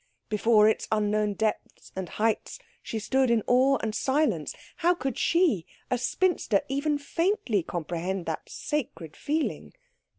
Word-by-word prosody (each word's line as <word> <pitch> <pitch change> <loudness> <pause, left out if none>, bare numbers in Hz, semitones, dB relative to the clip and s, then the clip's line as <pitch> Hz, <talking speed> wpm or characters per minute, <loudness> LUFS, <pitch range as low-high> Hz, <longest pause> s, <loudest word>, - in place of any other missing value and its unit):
Before 215 0 +4
its 220 - +1
unknown 210 -1 +1
depths 220 0 -3
and 190 -2 -4
heights 220 0 -1 0.2
she 225 - -5
stood 260 +4 +1
in 230 -3 +2
awe 265 +2 +4
and 220 -1 -1
silence. 285 +7 0 0.2
How 350 +1 +3
could 270 -7 -3
she, 315 - +2 0.2
a 250 - +1
spinster, 255 - +1
even 285 +2 0
faintly 330 - 0
comprehend 175 +2 -3
that 160 - -4
sacred 245 - -4
feeling? 305 +1 -2
230 Hz, 135 wpm, -27 LUFS, 205-290 Hz, 0.2 s, Before